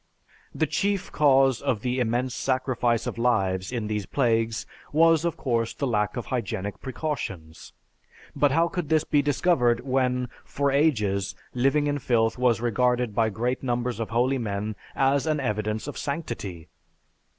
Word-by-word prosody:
The - - +2
chief 200 -2 -1
cause 135 -3 +4
of 115 -6 -1
the 125 +1 -1
immense 120 +1 0
sacrifice 125 -3 0
of - - -4
lives 95 -6 +1
in 120 -3 -2
these 105 -2 -3
plagues 115 -3 +1 0.3
was 165 +1 +4
of 170 - -1
course 115 -3 -1
the 140 - -2
lack 105 -4 0
of 120 - -3
hygienic 100 -5 -3
precautions. 100 - -5 0.6
But 145 - +3
how 165 +5 +3
could 175 -4 -4
this 155 -1 +3
be 145 -2 +2
discovered 135 -5 +2
when, 125 -1 0
for 140 0 -1
ages, 105 -10 +1 0.2
living 135 +4 +2
in 145 0 0
filth 115 -3 +1
was 125 -3 +3
regarded 125 0 +1
by 110 0 +2
great 120 +5 -2
numbers 120 -2 -2
of 115 - -3
holy 125 +4 +1
men 105 -1 -3 0.2
as 135 +2 +2
an 155 -1 +1
evidence 110 -3 -2
of 145 - -6
sanctity! 120 - -5
125 Hz, 155 wpm, -26 LUFS, 110-140 Hz, 0.6 s, cause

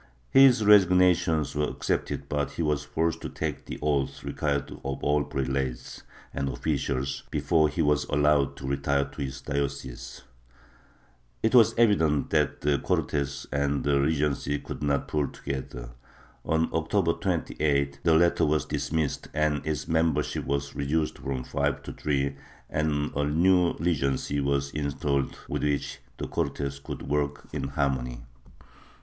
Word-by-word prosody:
His 130 -5 +6
resignations 90 -5 +5
were 75 0 +1
accepted - - -2
but 75 0 -2
he 85 - -2
was 75 -2 0
forced 80 +2 -1
to - - -5
take - - -4
the - - -5
oath 70 -3 0
required 70 0 -2
of 70 0 -4
all 75 0 +2
prelates 65 -2 -3 0.3
and 70 0 -2
officials 70 0 -2
before 80 -2 +2
he 80 +3 -1
was 75 0 +2
allowed 75 -1 +2
to 65 - -6
retire 70 0 +1
to 70 +1 -9
his 65 -1 -4
diocese. 70 -3 -4 1.2
It 110 - +2
was 120 -4 +6
evident 80 -11 +3
that 75 -2 +1
the 70 -1 +2
Cortes 70 0 -1
and 70 0 0
the 70 -1 +2
Regency 75 -1 0
could - - -8
not 70 -1 0
pull 75 -2 0
together; 65 -3 -6 0.5
on 80 0 +1
October 85 +1 +1
28th, 70 -6 -1
the 80 0 +4
latter 85 -1 +3
was 75 -1 +1
dismissed, 80 -2 -2
its 75 -2 0
membership 80 -2 0
was 70 0 -2
reduced 75 +3 -1
from 65 -2 -3
five - - -1
to - - -7
three 70 -1 -1 0.3
and 75 -1 0
a 75 - +1
new 85 +4 +3
Regency 70 -4 0
was 70 0 0
installed 70 -1 -1
with - - -2
which 70 -1 -2 0.2
the - - -4
Cortes 70 -1 -2
could - - -7
work 70 0 -2
in - - -2
harmony. 65 -3 -1
75 Hz, 145 wpm, -27 LUFS, 70-80 Hz, 1.2 s, His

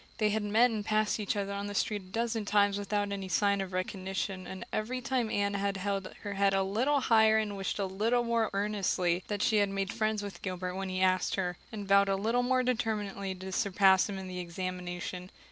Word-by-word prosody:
They 215 -2 +2
had 220 +1 0
met 220 +4 +3
and 215 -2 -2
passed 215 0 +1
each 210 0 -1
other 200 -1 -2
on 200 0 -3
the 205 - -5
street 205 +1 0
a - - -16
dozen 225 +3 -2
times 205 0 +2
without 205 0 -1
any 195 -1 -4
sign 200 +3 +2
of 190 -1 -5
recognition 190 0 -3
and 190 -1 -7
every 245 +4 -1
time 250 -2 -1
Anne 200 -1 0
had 200 0 -1
held 195 0 -2
her 205 -1 -3
head 200 0 +2
a 195 - +2
little 250 +9 +1
higher 220 -2 +5
and 210 -2 -1
wished 195 -1 -3
a 200 - 0
little 220 +6 +1
more 230 -1 +1
earnestly 195 -3 0
that 205 -1 -1
she 235 -4 +3
had 205 -1 +3
made 195 0 -2
friends 215 -1 0
with 195 -4 -7
Gilbert 185 -1 -3
when 190 0 -4
he 185 0 -2
asked 185 0 +2
her, 180 -2 -1 0.2
and 205 -2 -6
vowed 200 0 +5
a 195 - +2
little 225 +5 +1
more 255 +1 +2
determinedly 210 -5 -2
to 190 +1 -7
surpass 190 0 +4
him 200 - -4
in 190 0 -6
the 180 0 -5
examination. 180 0 -5
200 Hz, 225 wpm, -30 LUFS, 190-215 Hz, 0.2 s, higher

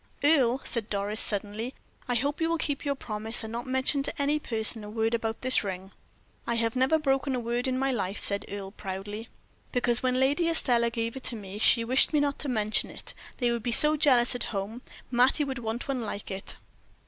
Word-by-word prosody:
"Earle," 270 -4 +4
said 230 -3 -2
Doris, 205 +1 +1
suddenly, 210 +5 0 0.3
"I 245 - 0
hope 285 +6 0
you 325 - +2
will 335 - +1
keep 285 -3 -3
your 285 -1 -1
promise, 220 -2 -2
and 220 - -6
not 240 +3 -5
mention 260 +2 +2
to 290 +3 -1
any 290 +2 +1
person 220 -4 0
a 210 - -8
word 225 +1 -1
about 225 -1 -2
this 255 +1 +3
ring." 190 -1 -6 0.6
"I 235 - 0
have 230 0 0
never 260 +5 +3
broken 270 -2 0
my 250 - -1
word 240 +2 -1
in 255 0 0
my 270 +1 +1
life," 200 -4 -3
said 200 0 0
Earle, 195 -1 -6
proudly. 205 +2 -6 0.4
"Because, 245 -1 +2
when 255 0 +1
Lady 290 +6 +2
Estelle 240 -7 +4
gave 230 0 -3
it 265 - -9
to 240 - +2
me, 200 -1 -8
she 230 +1 +4
wished 255 +6 +2
me 300 - +4
not 285 -1 0
to 290 - -3
mention 215 -3 +1
it; - - -7 0.2
they 245 -2 +1
would 235 -1 -2
be 240 - -2
so 300 +6 +6
jealous 260 -6 +4
at 245 - -3
home. 210 +4 -4 0.3
Mattie 255 +5 +4
would 265 -3 -4
want 230 +2 -4
one 270 -3 -2
like 205 -2 -6
it." 190 0 -5
240 Hz, 220 wpm, -28 LUFS, 220-270 Hz, 0.6 s, so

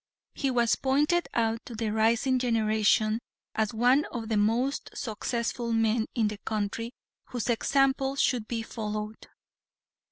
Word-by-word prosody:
He 275 - -1
was 240 -2 +2
pointed 300 +6 +1
out 225 0 +1
to 235 - -7
the 220 -1 -2
rising 230 +4 +2
generation 220 -2 +2 0.3
as 220 -1 0
one 250 +6 +3
of 230 -2 -6
the 220 - +1
most 235 +7 +1
successful 235 0 -2
men 225 0 +2
in 225 -3 +2
the 210 -1 -5
country 220 +2 -3 0.3
whose 245 -1 -2
example 270 +2 +2
should 245 -5 +1
be 230 -2 -2
followed. 215 -1 -5
230 Hz, 135 wpm, -28 LUFS, 220-255 Hz, 0.3 s, one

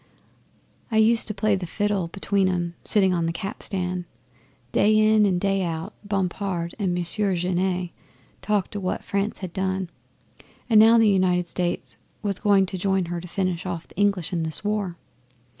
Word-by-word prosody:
I 220 - +1
used 225 +1 +4
to 215 - -2
play 215 0 +2
the 185 -2 -4
fiddle 205 -1 -1
between 195 +2 0
'em, 175 -2 -2
sitting 190 -3 +4
on 170 -2 0
the - - 0
capstan. 180 0 -3 0.7
Day 215 +1 +4
in 215 -1 +5
and 180 -2 +1
day 195 0 +1
out 165 -2 -3
Bompard 190 -3 -2
and 185 -4 0
Monsieur 185 +3 0
Genet 180 0 -1 0.5
talked 205 0 -1
o' - - -1
what 185 -2 -3
France 200 +2 -2
had 175 - -9
done, 190 -1 -2 0.8
and 220 -3 +6
how 225 +1 +7
the 225 -1 +5
United 185 -3 +2
States 175 0 -3 0.3
was 200 -2 -1
going 200 -2 +4
to 185 0 -5
join 190 -1 +1
her 170 - -3
to 180 - -9
finish 185 -1 -2
off 170 -2 -5
the - - -20
English 200 -4 0
in 170 - 0
this 160 +3 -5
war. 205 -4 -2
190 Hz, 175 wpm, -24 LUFS, 180-205 Hz, 0.8 s, how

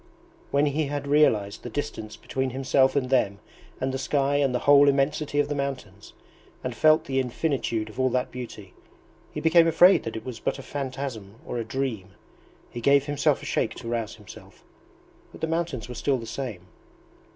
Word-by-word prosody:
When 140 +1 +2
he 150 +2 0
had 145 0 -4
realized 110 -9 +2
the 120 - -7
distance 110 -6 -5
between 130 +3 -3
himself 130 +1 +2
and 130 -2 0
them 105 -7 +2 0.4
and 130 0 -1
the 135 - -2
sky 140 +1 +1
and 140 -2 +2
the 125 - +1
whole 145 0 +7
immensity 145 +1 0
of 145 - +2
the 145 - -2
mountains, 130 -8 -5 0.5
and 125 - -3
felt 155 +5 +4
the 135 -3 0
infinitude 125 -4 -1
of 110 +4 -11
all 130 0 +3
that 125 0 -1
beauty, 110 -6 -8 0.6
he - - -5
became 165 +1 +5
afraid 175 +4 +6
that 115 - -4
it 110 - -6
was 125 -3 -6
but - - -2
a 135 - -9
phantasm 130 -8 -5
or 120 - -4
a - - -2
dream. 115 -6 -4 0.6
He 120 - -6
gave 140 +2 +4
himself 145 -1 +1
a - - -7
shake - - -1
to - - -9
rouse 115 -2 -3
himself, 105 -2 -14 0.7
but - - -13
the - - +1
mountains 165 -8 -2
were 125 - -7
still 135 +3 0
the 115 - -7
same. 115 -8 -6
130 Hz, 190 wpm, -26 LUFS, 115-145 Hz, 0.7 s, whole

